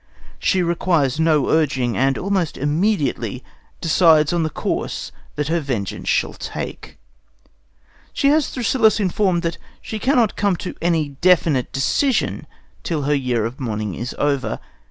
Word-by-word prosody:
She 185 -1 +2
requires 170 -5 +1
no 155 -3 +3
urging, 135 -7 +1
and 135 +1 +2
almost 190 -4 -1
immediately 145 - 0 0.4
decides 160 -2 +4
on 170 - +1
the 160 - 0
course - - -3 0.2
that 150 0 -2
her 170 +1 +1
vengeance 125 - -3
shall - - +1
take. - - -7 1.1
She 275 - +2
has 305 0 +3
Thrasyllus 230 -3 +2
informed 185 -2 +1
that 165 0 -2 0.2
she 220 - -6
cannot 245 -3 +2
come 200 -2 +1
to 180 - -6
any 165 -3 +1
definite 165 -7 +3
decision 225 - 0 0.3
till 155 -4 -2
her 145 +2 +1
year 125 -5 0
of 120 +5 -5
mourning 110 -5 -3
is 120 +8 -5
over. 140 -2 0
160 Hz, 140 wpm, -20 LUFS, 135-185 Hz, 1.1 s, decides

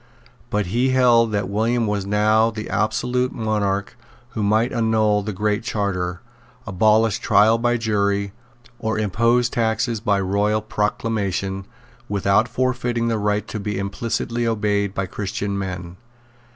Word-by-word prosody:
But 105 -1 0
he 125 +3 +2
held 120 -3 +4
that 100 -2 -1
William 115 +4 0
was 100 -2 -2
now 110 +2 +3
the 110 -1 -6
absolute 125 +4 0
monarch, 105 -4 -1 0.3
who 110 - -4
might 110 +4 +2
annul 110 -2 +2
the 105 +1 -4
Great 105 +2 -1
Charter, 95 -6 -2 0.4
abolish 110 +2 +2
trial 110 +3 +4
by 120 +1 +1
jury, 100 -3 0 0.5
or 110 -2 -1
impose 115 +4 +2
taxes 115 0 0
by 105 -2 +1
royal 100 +3 0
proclamation, 100 -3 -2 0.4
without 100 +2 +2
forfeiting 125 -2 -1
the 115 -2 0
right 105 0 0
to 110 - -4
be 105 0 -3
implicitly 115 +4 -2
obeyed 105 -3 0
by 95 - -1
Christian 100 +1 -4
men. 90 -2 -5
105 Hz, 135 wpm, -21 LUFS, 100-115 Hz, 0.5 s, held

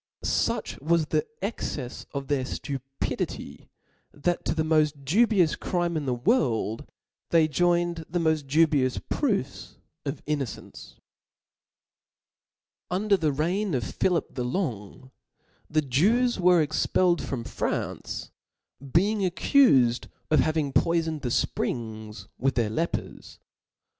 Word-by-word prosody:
Such - - -1
wa^ 165 +4 +2
the 160 - 0
the 150 0 0 0.2
excefs 135 - -5
of 140 -1 -5
their 140 -2 0
(lupidity, 135 0 -5 0.4
that 175 +4 -1
to - - 0
the 160 - +1
mod 155 -3 +1
dubious 195 - +3
crime 175 -2 -1
in 150 -3 -2
the 125 - +1
world, 120 - 0 0.4
they 165 -2 +4
joined 175 +1 +1
the 175 - -1
moil 160 -1 +3
dubious 145 -2 +2
proofs 200 - -2 0.3
of 140 -1 -5
innocence. 140 -7 -5 1.9
Under 200 +3 +2
the 160 -5 +1
reign 175 +5 0
of 125 - -1
Philip 180 +6 -1
the 125 - -3
Longy 125 - -4 0.6
the 155 0 +1
Jews 205 - +2
were 180 -2 +5
expelled 170 +3 +1
from 125 -4 -4
France, - - -4 0.5
being 185 +10 +1
accufed 180 - +3 0.2
of 155 - +5
hav 155 +4 +2
ing 145 -3 -1
poifoned 165 -2 +1
the 125 - -2
fprings 110 -2 -2
with 135 +2 +1
their 115 -3 +1
lepers. 165 +9 -4
155 Hz, 125 wpm, -26 LUFS, 135-175 Hz, 1.9 s, were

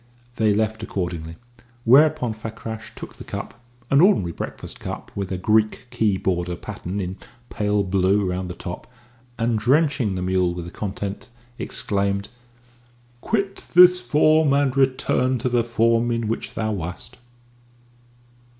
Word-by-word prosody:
They 110 -1 +3
left 110 +1 0
accordingly; 85 -6 -4 0.5
whereupon 135 -1 +5
Fakrash 110 0 -7
took - - -9
the - - -9
cup 115 - -7 0.3
an 140 +2 +6
ordinary 175 - +4
breakfast - - -7
cup - - -7
with 100 -2 -4
a 95 - -1
Greek 110 +5 +1
key 110 -5 +1
border 90 -2 -1
pattern 90 +3 -6
in 95 0 -4 0.3
pale 105 -1 +1
blue 95 +1 +2
round 90 0 -3
the 90 - -6
top 90 -1 -7 0.5
and, 115 -1 +1
drenching 135 -3 +2
the 90 - -3
mule 90 -1 +1
with 90 -1 -5
the 85 - -8
contents, 100 -1 -5 0.3
exclaimed, 100 0 -1 0.9
"Quit 200 -3 -1 0.2
this 180 0 +8
form 150 +3 +3
and 140 -2 +2
return 130 -1 +2
to 125 +2 -1
the 120 -1 +2
form 115 0 +2
in 115 -1 -1
which 115 - -4
thou 110 -1 -1
wast!" 100 +6 -6
110 Hz, 140 wpm, -23 LUFS, 95-125 Hz, 0.9 s, this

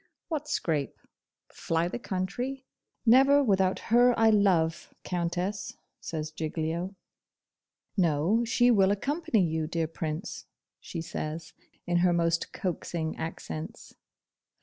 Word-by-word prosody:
'What 300 -3 -3
scrape? 150 - -1 0.6
fly 165 +1 0
the 180 - -4
country? 245 +7 -3 0.4
Never 270 +4 +6
without 190 -5 +2 0.2
her 245 0 +6
I 225 0 +5
love, 180 -6 +2
Countess,' 180 +3 -2 0.2
says 155 -1 -4
Giglio. 165 +4 -3 1.0
'No, 175 +5 +2
she 245 +1 +3
will 195 -4 +5
accompany 225 - +1
you, 160 -1 -1
dear 165 0 -1
Prince,' 160 +2 -5 0.3
she 165 - -6
says, 160 0 -5 0.3
in 175 -1 +1
her 175 0 +4
most 170 -1 +1
coaxing 170 -3 -3
accents. 80 - -6
180 Hz, 110 wpm, -28 LUFS, 160-220 Hz, 1.0 s, Never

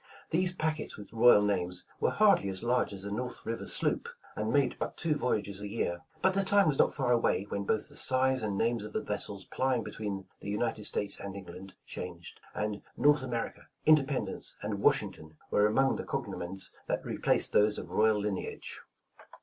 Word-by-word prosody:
These 180 +2 +4
packets 155 -2 -2
with 105 +1 -11
royal 115 -2 +7
names, 90 -3 -1
were - - +2
hardly 200 - +4
as 95 -1 -2
large 125 -1 +1
as 100 -1 -7
a 100 - -4
North 125 +4 -4
River 115 0 -4
sloop, - - -1 0.3
and 110 +1 -1
made 135 -2 +2
but - - -4
two 165 -2 +1
voyages 105 -8 -1
a 105 - -4
year, 90 -5 -2 0.2
but 190 - +5
the 195 +1 +3
time 200 -1 +4
was 145 -3 +1
not - - +4
far 130 -4 0
away, 115 -5 +2
when 100 0 -3
both 110 - 0
the - - -10
size 130 0 +3
and 105 -2 -2
names 115 0 +1
of 105 - -8
the - - -1
vessels 100 -2 -4
plying 130 -3 0
be - - -7
tween 100 -3 -4
the 100 - -7
United 105 0 -1
States 105 - +1
and 100 -1 -6
England 95 0 -9
changed, 85 -2 -8 0.2
and 105 -1 -2 0.2
"North 145 -1 +4
America," 120 -3 -4 0.2
"Independence" 135 -9 +2
and - - -3
"Washing - - +3
ton" 80 0 -14
were 105 - +4
among 135 +5 +2
the - - -4
cognomens 95 +2 -4 0.2
that - - -2
replaced - - +1
those 105 0 +4
of - - -7
royal 110 -1 +3
lineage. 100 -2 -4
110 Hz, 195 wpm, -31 LUFS, 100-130 Hz, 0.3 s, royal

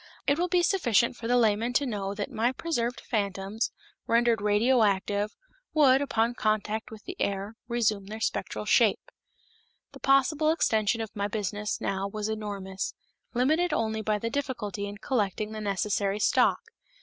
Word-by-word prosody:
It 285 +2 +2
will 355 - +2
be 355 0 +2
sufficient 245 - +2
for 230 - -6
the 245 +1 +3
layman 225 +1 +2
to 280 - +2
know 200 -5 -3
that 205 0 -4
my 235 +3 +1
preserved 245 -6 -2
phantoms, 200 0 -2 0.4
rendered 235 -1 +3
radio 220 +5 +3
active, 205 +1 +1 0.4
would, 275 -3 +6
upon 235 -4 +1
contact 215 0 -1
with 220 -2 -11
the 370 - -7
air, 200 +2 -2
resume 220 -5 0
their 215 +2 -6
spectral - - -2
shape. - - +3 0.8
The - - -13
possible 280 +3 +3
extension 225 -8 +2
of 220 - -6
my 200 -1 -1
business 210 0 -3
now 195 0 -2
was 210 +1 -4
enormous, 200 -3 -4 0.4
limited 310 +7 +2
only 220 -5 0
by 215 0 0
the 230 +2 -3
difficulty 235 -8 -3
in 205 0 -7
collecting 210 -2 -1
the 215 0 -5
necessary 200 0 0
stock. - - +3
220 Hz, 160 wpm, -28 LUFS, 205-245 Hz, 0.8 s, would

